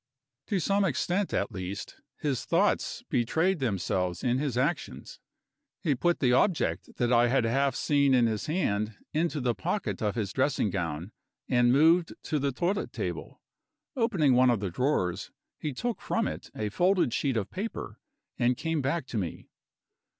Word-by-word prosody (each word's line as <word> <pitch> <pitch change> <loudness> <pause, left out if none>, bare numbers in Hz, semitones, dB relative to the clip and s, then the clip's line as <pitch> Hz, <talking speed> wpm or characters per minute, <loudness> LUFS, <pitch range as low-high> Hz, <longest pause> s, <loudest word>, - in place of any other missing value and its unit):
To 200 - 0
some 200 +4 +2
extent 180 +4 0
at 100 - -1
least, 95 +1 -6 0.2
his 140 -5 -1
thoughts 200 +6 +1
betrayed 160 +10 +1
themselves 90 -6 -1
in 125 0 +1
his 140 -4 -2
actions. 150 +6 -2 0.6
He 150 - +2
put 175 +7 0
the 125 -3 +4
object 165 +6 +1
that 120 -1 +2
I 120 0 +5
had 130 0 +2
half 135 +4 +1
seen 140 -2 +3
in 120 -2 +4
his 110 -2 -1
hand 110 - -1 0.2
into 155 -1 0
the 125 -2 +1
pocket 180 - -3
of 105 -2 0
his 105 -5 -2
dressing 130 -6 +1
gown, 85 0 -3 0.4
and 120 -1 +4
moved 165 +5 +4
to 150 - -1
the 140 0 0
toilet 175 +10 -1
table. - - -5 0.5
Opening 195 - +2
one 125 +1 +5
of 120 -4 +2
the 100 -3 -3
drawers, 95 - 0 0.3
he 150 - -3
took 235 - -3
from 230 -1 0
it - - -6
a 105 -1 -2
folded 180 - +2
sheet 135 -5 0
of 105 -3 -3
paper, 205 +5 -5 0.4
and 120 0 +2
came 165 -2 -1
back 140 +3 -1
to 120 -4 -3
me. 90 -4 -5
135 Hz, 165 wpm, -28 LUFS, 115-165 Hz, 0.6 s, I